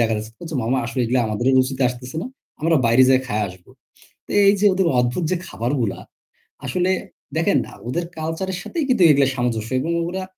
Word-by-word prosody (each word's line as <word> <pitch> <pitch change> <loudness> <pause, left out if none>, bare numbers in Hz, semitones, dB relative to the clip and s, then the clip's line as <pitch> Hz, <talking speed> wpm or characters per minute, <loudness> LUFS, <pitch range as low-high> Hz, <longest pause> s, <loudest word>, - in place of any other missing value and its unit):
দেখাচ্ছে। 110 -1 0
কচ্ছে 160 -2 -7
"মামা 125 +3 0
আসলে 120 +3 -5
এগুলা 125 +2 +1
আমাদের 110 +4 -2
রুচিতে 130 +1 +1
আসতেছে 125 +2 -7
না। - - -4 0.3
আমরা 165 +1 +3
বাইরে 115 +3 +5
যাইয়া 130 0 +5
খাইয়া 105 -2 -1
আসবো।" 90 -1 -14 0.6
তো - - -10 0.2
এই 200 - +8
যে 210 - +3
ওদের 185 -2 +1
অদ্ভুত 125 +8 0
যে - - +2
খাবারগুলা 120 -2 -2 0.7
আসলে 185 0 0 0.5
দেখেন - - +2
না - - -12 0.2
ওদের 170 +7 -1
কালচারের 170 +4 -3
সাথেই 325 -4 -3
কিন্তু 250 -7 +3
এগুলা 140 -2 +5
সামঞ্জস্য 115 -3 -2
এবং 165 +5 -2 0.2
ওরা 190 +2 -4
130 Hz, 185 wpm, -21 LUFS, 115-170 Hz, 0.7 s, এই